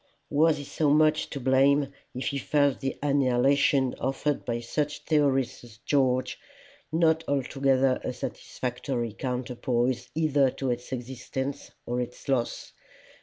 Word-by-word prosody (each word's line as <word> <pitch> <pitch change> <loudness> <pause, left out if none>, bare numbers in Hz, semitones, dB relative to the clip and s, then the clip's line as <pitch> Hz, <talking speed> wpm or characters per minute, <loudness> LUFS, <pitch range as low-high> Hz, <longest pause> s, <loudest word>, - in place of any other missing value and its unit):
Was 155 +1 +4
he 145 - -6
so 150 +1 0
much 155 +1 +3
to 140 - -5
blame 135 +2 +3 0.2
if 130 - -2
he 140 - -2
felt 145 -2 +2
the 135 -1 -3
annihilation 135 -1 +3
offered 135 +2 -1
by 120 -1 -1
such 150 +5 -3
theorists 140 -6 +1
as 115 -2 -14
George, 130 -1 +1 0.5
not 160 0 +3
altogether 135 -1 +1
a - - -2
satisfactory 125 -1 -4
counterpoise 125 0 -2
either 145 -4 +3
to 130 0 -2
its 120 +1 -5
existence 130 +2 -5 0.2
or 125 +1 -1
its 125 0 -7
loss? 130 -4 -1
135 Hz, 130 wpm, -27 LUFS, 125-145 Hz, 0.5 s, Was